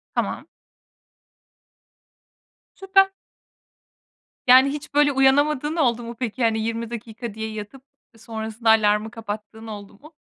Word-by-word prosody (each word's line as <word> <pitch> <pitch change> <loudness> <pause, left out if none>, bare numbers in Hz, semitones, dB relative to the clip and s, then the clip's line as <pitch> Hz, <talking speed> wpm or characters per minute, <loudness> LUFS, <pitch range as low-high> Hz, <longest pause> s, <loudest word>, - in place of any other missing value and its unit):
Tamam. - - -2 2.3
Süper. 390 0 +3 1.3
Yani, 260 +2 +7
hiç, 290 0 -7
böyle, 290 0 +4
uyanamadığın 285 +3 +2
oldu 240 -7 +1
mu 235 +1 -7
peki? 250 0 -3
Hani, 220 -1 +2
20 230 +1 -3
dakika 235 -1 -7
diye 220 +1 -5
yatıp, 215 +5 -8 0.3
ııı, - - -20
sonrasında 220 0 -3
alarmı 215 0 +3
kapattığın 220 0 -8
oldu 205 -2 -9
mu? 305 +3 -16
230 Hz, 115 wpm, -23 LUFS, 220-275 Hz, 2.3 s, Yani